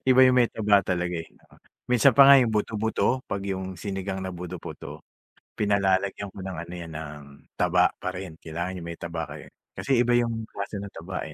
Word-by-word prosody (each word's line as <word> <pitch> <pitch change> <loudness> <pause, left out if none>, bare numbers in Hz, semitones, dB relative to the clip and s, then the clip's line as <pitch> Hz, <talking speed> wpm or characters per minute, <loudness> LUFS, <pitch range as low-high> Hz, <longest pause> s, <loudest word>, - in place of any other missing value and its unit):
Iba 130 0 +7
yung 130 -1 +6
may 120 - +5
taba 105 -2 +3
talaga 90 -1 -1
eh. 80 - -6 0.6
Minsan 125 -3 +5
pa 140 -1 +9
nga 140 - +10
yung 120 -3 +3
buto-buto, 110 +4 0
'pag 100 -1 -3
yung 95 0 -4
sinigang 95 0 -4
na 95 - -4
buto-buto, 90 -1 -8 0.6
pinalalagyan 100 -1 +1
ko 95 - -17
ng 95 -3 -5
ano 85 +1 -9
'yan, 85 -1 -8
ng 75 -1 -7 0.4
taba - - +4
parin, 90 -3 -6
kailangan 85 +3 -5
'yong 85 - -7
may 85 - -6
taba 85 -1 -3
kayo. 75 +1 -10 0.2
Kasi 135 -2 0
iba 120 0 +3
'yong 115 -2 +1
klaseng 100 -1 -6
taba 90 +2 -5
eh 80 - -9
95 Hz, 185 wpm, -26 LUFS, 85-110 Hz, 0.6 s, nga